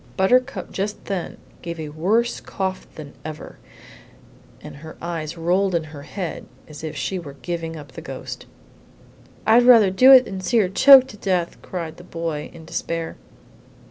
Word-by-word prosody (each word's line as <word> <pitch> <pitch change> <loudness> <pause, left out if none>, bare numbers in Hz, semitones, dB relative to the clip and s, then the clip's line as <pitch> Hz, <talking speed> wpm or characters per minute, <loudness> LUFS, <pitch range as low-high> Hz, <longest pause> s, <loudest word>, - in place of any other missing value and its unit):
Buttercup 210 0 +1
just 205 +2 -4
then 195 -4 -4 0.2
gave 170 -1 -6
a 155 -1 -5
worse 205 +11 0
cough 190 -1 -4
than 150 -2 -10
ever, 155 -1 -9 1.0
and - - -11
her 160 +2 -11
eyes 165 -1 -5
rolled 180 +3 +1
in 165 - 0
her 145 - -9
head 180 +3 -6 0.2
as 150 0 -11
if 155 -1 -5
she 180 +7 -3
were 145 -5 -10
giving 165 -2 -4
up 145 -4 -10
the - - -9
ghost. - - -8 1.0
"I'd 225 +3 +6
rather 230 -6 +6
do 255 +8 +7
it 255 -2 +9
than 190 -3 -6
see 235 +5 +1
her 200 -5 +3
choke 265 +6 +8
to 210 - -11
death!" 185 -4 -2
cried 170 -4 -6
the 175 - -12
boy, 165 -4 -5
in 165 -2 -13
despair. 165 0 -4
175 Hz, 170 wpm, -22 LUFS, 160-200 Hz, 1.0 s, it